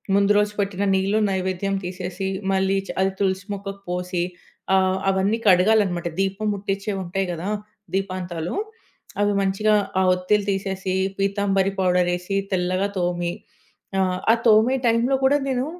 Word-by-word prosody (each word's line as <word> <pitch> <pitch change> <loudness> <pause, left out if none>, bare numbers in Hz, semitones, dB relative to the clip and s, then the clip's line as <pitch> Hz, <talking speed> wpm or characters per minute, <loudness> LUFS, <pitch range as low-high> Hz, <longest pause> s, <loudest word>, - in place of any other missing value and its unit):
ముందు 200 +1 +4
రోజు 210 0 +2
పెట్టిన 200 0 -1
నీళ్లు 195 +3 +1
నైవేద్యం 190 +1 -1
తీసేసి 180 +1 -5 0.3
మళ్ళీ 190 0 +2
చ - - -16
అది 190 0 +2
తులసి 190 0 0
మొక్కకు 195 0 -7
పోసి 180 0 -2 0.5
ఆహ్, 190 0 +2
అవన్నీ 195 +4 +1
కడగాలన్నమాట. 185 -2 +4
దీపం 195 +2 -1
ముట్టించేవుంటాయి 195 -1 -2
గదా! 175 +4 -4 0.4
దీపాంతాలు. 185 -3 -3 0.7
అవి 205 0 +3
మంచిగా 195 +2 +2 0.3
ఆ - - +3
ఒత్తిలు 190 +3 +1
తీసేసి 190 -1 -2 0.2
పీతాంబరి 195 -1 +1
పౌడర్ 180 -1 +2
ఏసి 180 +3 -4 0.2
తెల్లగా 185 +2 0
తోమి 175 -1 -1 0.7
ఆహ్, 185 -1 +1
ఆ - - +6
తోమే 225 +4 +5
టైంలో 235 +4 +3
కూడా 280 +2 +5
నేను 260 0 0
195 Hz, 135 wpm, -23 LUFS, 185-200 Hz, 0.7 s, ఆ